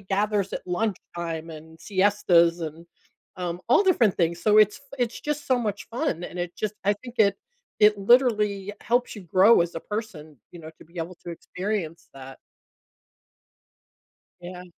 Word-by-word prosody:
gathers 200 0 -1
at - - -5
lunchtime 175 -4 -4
and 160 +1 -12
siestas 185 -4 +3
and, 160 +1 -7 0.5
um, 175 -1 -4
all 250 - +5
different 240 - +3
things. 170 -1 0
So, 210 -1 +4
it's 210 +4 +4 0.2
f 275 - -18
it's 245 -2 -2
just 295 0 -4
so 255 -1 +2
much 210 -4 -3
fun, 235 - -2
and 180 - -8
it 175 0 -4
just 215 -1 -3
I 205 - +3
think 240 +4 -12
it 200 -2 +4 0.4
it 210 -1 +5
literally 210 -3 +2
helps 245 +2 0
you 205 - -7
grow 190 +6 +5
as 170 0 -1
a 165 - -4
person, 190 -9 -7 0.2
you 175 - -11
know, 160 0 -10
to - - -15
be 170 +2 -21
able 165 +3 -5
to 175 - -6
experience 180 -1 -5
that. 135 0 -11 2.0
Yeah. 180 +1 -9
195 Hz, 165 wpm, -25 LUFS, 170-215 Hz, 2.0 s, all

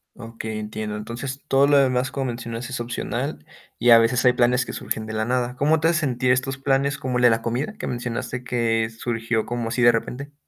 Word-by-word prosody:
Okey, 115 -2 -6
entiendo. 105 0 -5
Entonces, 125 +6 -6
todo 135 0 +4
lo 145 - +4
demás, 130 -1 +2
como 135 -1 -2
mencionas, 115 0 -5
es 130 -2 -4
opcional, 120 - -4 0.4
y 120 - +3
a 115 - +10
veces 115 +2 +2
hay 125 - +6
planes 125 +1 +3
que - - -7
surgen 110 0 -4
de 110 - -5
la 110 0 -1
nada. 125 +1 -1
¿Cómo 155 +4 +2
te 165 - +2
hace 170 0 +2
sentir 125 -2 +1
estos 135 +2 0
planes, 135 0 +1
como 130 -2 -2
el 125 - 0
de 120 - +7
la 115 0 +1
comida, 125 - -2
que - - -4
mencionaste 120 +1 -4
que 115 -2 0
surgió 115 -1 -2
como 120 -1 -3
así 120 +2 -1
de 120 0 +7
repente? 130 +5 -4
120 Hz, 225 wpm, -23 LUFS, 115-135 Hz, 0.4 s, a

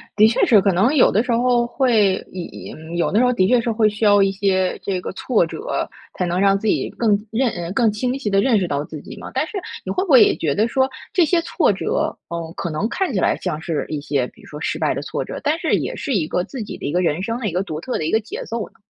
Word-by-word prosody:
的 215 +1 +6
确 225 - +1
是， 220 - +7
可 195 0 +2
能 215 +11 +3
有 275 - +5
的 215 - +2
时 250 - -2
候 240 0 +2
会 225 -7 +3 0.2
也 185 -2 -5
也 - - -9
嗯， 160 +2 -8
有 170 - +1
的 210 - +3
时 250 - +4
候 250 - +3
的 185 -7 +2
确 245 +2 +4
是 230 - -1
会 220 -1 +3
需 210 +1 -3
要 205 -1 +6
一 195 - +2
些 190 -1 0
这 190 -2 -2
个 - - -5
挫 210 -1 +1
折， 435 - -3 0.3
才 180 - 0
能 175 +1 -1
让 195 0 +4
自 220 - -4
己 - - +1
更 230 -3 0 0.2
认 245 +4 +1
呃， 175 0 -5
更 225 +1 +3
清 250 +5 -2
晰 220 -7 -3
地 195 0 +4
认 235 -1 +3
识 180 - -1
到 145 -2 -1
自 155 0 -8
己 - - -9
嘛。 - - -8
但 - - 0
是 420 - -6 0.3
你 - - -3
会 370 - 0
不 390 - -7
会 260 -5 +8
也 - - +3
觉 150 -4 -1
得 215 +2 +2
说 265 +2 +1 0.2
这 360 - +4
些 335 +2 +2
挫 - - +2
折， - - -1
嗯， 165 -1 -4
可 170 - -4
能 155 +9 -1
看 380 -2 -1
起 195 - +1
来 - - +2
像 160 -4 -4
是 160 -2 -2
一 150 -2 -3
些， 140 -3 0
比 - - -21
如 - - -16
说 150 - -9
失 - - -2
败 - - +1
的 - - -4
挫 - - -3
折， - - -7
但 310 +2 +1
是 - - +1
也 - - -2
是 280 - -3
一 175 -6 +1
个 180 - -1
自 235 +4 -6
己 - - -7
的 - - -12
一 - - -2
个 175 - +1
人 170 -1 0
生 230 +4 -2
的 230 - -2
一 - - -2
个 180 +2 0
独 155 -6 -5
特 250 +10 -3
的 155 - -2
一 160 - -1
个 220 - +3
节 220 - -7
奏 230 -1 -3
呢？ - - -36
205 Hz, 325 characters per minute, -21 LUFS, 175-240 Hz, 0.3 s, 会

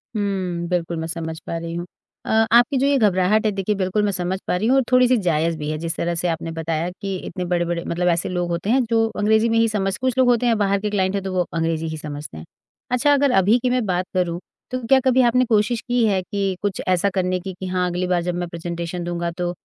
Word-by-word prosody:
हुँ, 185 -4 -2
बिल्कुल 170 -2 -1
मैं 160 0 -3
समझ 160 -1 -5
पा 165 - -2
रही 165 0 -5
हूँ। 175 0 -4 0.4
अ, - - -6 0.2
आपकी 240 +3 +5
जो 265 - +2
ये 280 0 +3
घबराहट 210 -1 +2
है 215 - +3
देखिए 200 +1 -1
बिल्कुल 190 +2 0
मैं 205 - +1
समझ 185 0 -2
पा - - +1
रही 200 +5 0
हूँ 260 - +4
और 270 - +3
थोड़ी-सी 255 0 +5
जायज़ 165 -4 0
भी 150 -1 -4
है, 155 - -3
जिस 165 +1 -3
तरह 170 0 -1
से 175 +1 -1
आपने 165 -1 -3
बताया 165 +1 -2
कि 195 -1 -3
इतने 180 -2 -4
बड़े-बड़े 175 -1 -1
मतलब 175 +1 -1
ऐसे 170 -1 +1
लोग 175 -1 -2
होते 170 +4 -2
हैं 255 +2 +3
जो 225 -1 +3
अंग्रेज़ी 220 +2 +3
में 230 - +2
ही 230 0 +4
समझ 195 -2 -1
कुछ 255 0 -1
लोग 260 -1 +4
होते 245 0 +2
हैं 230 -2 +3
बाहर 200 -1 +1
के 210 - -1
क्लाइंट 190 -1 0
हैं, 200 - -2
तो 190 -1 -4
वो 180 -1 +1
अंग्रेज़ी 165 -1 -1
ही 160 0 -4
समझते 150 - -7
हैं। 80 - -9 0.5
अच्छा 250 +4 +3
अगर 280 -1 +3
अभी 205 +6 +4
की 250 - 0
मैं 250 -2 +1
बात 180 -1 0
करूँ, 175 -2 0 0.3
तो 255 - -1
क्या 270 +2 +6
कभी 260 0 +3
आपने 250 +1 +3
कोशिश 225 +1 +1
की 245 -1 +2
है 195 -3 +2
कि 195 +1 -2
कुछ 200 -3 -2
ऐसा 185 +2 +2
करने 185 -1 0
की, 190 +1 -6
कि 185 +1 -7
हाँ, 180 0 0
अगली 180 +1 -2
बार 180 -1 +1
जब 175 0 -2
मैं 175 0 -3
प्रेज़ेंटेशन 170 +1 -5
दूँगा 170 0 -3
तो 175 +1 -3
185 Hz, 260 wpm, -21 LUFS, 170-220 Hz, 0.5 s, क्या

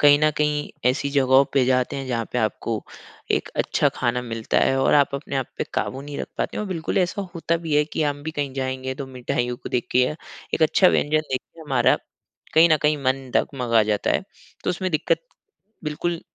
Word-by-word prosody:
कहीं 145 0 +7
न 155 0 +4
कहीं 150 -1 0 0.2
ऐसी 140 +2 -2
जगहों 135 -1 +5
पे 135 -2 +4
जाते 125 +2 +1
हैं 135 -1 -4
जहाँ 115 -2 -1
पे 125 - 0
आपको 110 0 -1 0.5
एक - - +1
अच्छा - - +2
खाना 125 0 0
मिलता 115 -2 -1
है 135 - +3
और - - +4
आप 140 -1 +4
अपने 140 0 -4
आप 130 - -1
पे - - 0
काबू 130 - -2
नहीं 145 0 -7
रख - - -3
पाते - - -2
हैं - - -1
और 205 - -5
बिल्कुल 170 +1 -1
ऐसा 185 +2 0
होता 170 0 0
भी 155 -2 0
है 150 - +4
कि 155 - -2
हम 145 -1 -1
भी 160 - -3
कहीं 145 -3 -3
जाएँगे 130 0 -3
तो 140 -1 -6
मिठाइयों 125 -1 -2
को - - -8
देख 125 - -1
के 125 - +2
या 150 - -2 0.4
एक 160 - 0
अच्छा 185 +4 +5
व्यंजन 155 -1 +2
देख 130 - 0
के 165 - -19
हमारा 145 -4 +3 0.6
कहीं 165 +2 +7
न - - +6
कहीं 150 0 +3
मन 130 0 0
डगमगा 120 -5 +2
जाता 105 -1 0
है। - - +2 0.4
तो - - +1
उसमें 185 +1 -2
दिक्कत 155 - +1 0.6
बिल्कुल 165 +3 -2
140 Hz, 220 wpm, -23 LUFS, 130-155 Hz, 0.6 s, कहीं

